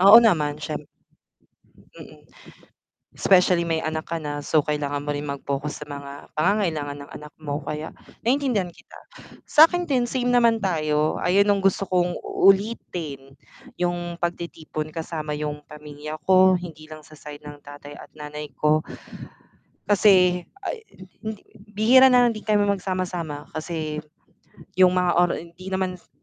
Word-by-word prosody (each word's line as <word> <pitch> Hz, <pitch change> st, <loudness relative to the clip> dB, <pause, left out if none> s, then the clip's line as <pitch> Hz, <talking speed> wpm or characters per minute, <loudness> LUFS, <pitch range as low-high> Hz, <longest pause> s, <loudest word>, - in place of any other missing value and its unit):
Oo 200 Hz, +4 st, +10 dB
naman, 150 Hz, -10 st, +2 dB
siyem 150 Hz, -, -4 dB, 1.2 s
mm. -, -, -13 dB, 0.9 s
Specially 180 Hz, -2 st, +4 dB
may 165 Hz, -1 st, 0 dB
anak 155 Hz, +1 st, -3 dB
ka 165 Hz, -, -3 dB
na, 145 Hz, -1 st, -5 dB
so 155 Hz, -, +3 dB
kailangan 145 Hz, -1 st, -2 dB
mo 145 Hz, -, -6 dB
rin 145 Hz, 0 st, -2 dB
mag-focus 140 Hz, +1 st, -4 dB
sa -, -, -5 dB
mga 140 Hz, 0 st, -9 dB
pangangailangan 160 Hz, -5 st, 0 dB
ng 140 Hz, -, -11 dB
anak 150 Hz, 0 st, -12 dB
mo, 145 Hz, -2 st, -3 dB
kaya 150 Hz, +1 st, -4 dB, 0.3 s
naiintindihan 245 Hz, -7 st, +1 dB
kita. -, -, -16 dB, 0.5 s
Sa'kin 330 Hz, +3 st, +5 dB
din, 255 Hz, -7 st, 0 dB
same 245 Hz, 0 st, 0 dB
naman 235 Hz, -2 st, +4 dB
tayo, 155 Hz, -4 st, 0 dB
ayun 190 Hz, +3 st, +3 dB
'yung 200 Hz, -1 st, +2 dB
gusto 195 Hz, 0 st, +1 dB
kong 180 Hz, -2 st, 0 dB
ulitin, 175 Hz, -9 st, 0 dB, 0.4 s
'yung 175 Hz, -1 st, -2 dB
pagtitipon 170 Hz, -3 st, -4 dB
kasama 155 Hz, -2 st, -4 dB
'yung 150 Hz, 0 st, -4 dB
pamilya 150 Hz, 0 st, -8 dB
ko, 185 Hz, 0 st, +6 dB
hindi 160 Hz, -3 st, -9 dB
lang 155 Hz, -1 st, -11 dB
sa 155 Hz, -, -19 dB
side 150 Hz, 0 st, -11 dB
ng 145 Hz, 0 st, -10 dB
tatay 145 Hz, 0 st, -11 dB
at -, -, -12 dB
nanay 150 Hz, 0 st, -7 dB
ko. 155 Hz, 0 st, +3 dB, 1.1 s
Kasi, 185 Hz, -3 st, +4 dB, 0.2 s
ah, -, -, -1 dB
hin 440 Hz, -, -13 dB, 0.2 s
hindi 220 Hz, -1 st, -6 dB, 0.3 s
bihira 245 Hz, +6 st, +6 dB
na 250 Hz, -1 st, +5 dB
lang 235 Hz, -, +2 dB
din 215 Hz, -, -8 dB
kami 210 Hz, -1 st, +3 dB
magsama-sama, 180 Hz, -6 st, -3 dB
kasi 155 Hz, -1 st, -4 dB, 0.8 s
'yung 185 Hz, -1 st, +6 dB
mga 180 Hz, -1 st, +2 dB
ora 175 Hz, -1 st, +3 dB
hindi 170 Hz, +3 st, -10 dB
naman 190 Hz, -1 st, -2 dB
s -, -, -30 dB
170 Hz, 150 wpm, -24 LUFS, 150-195 Hz, 1.2 s, Oo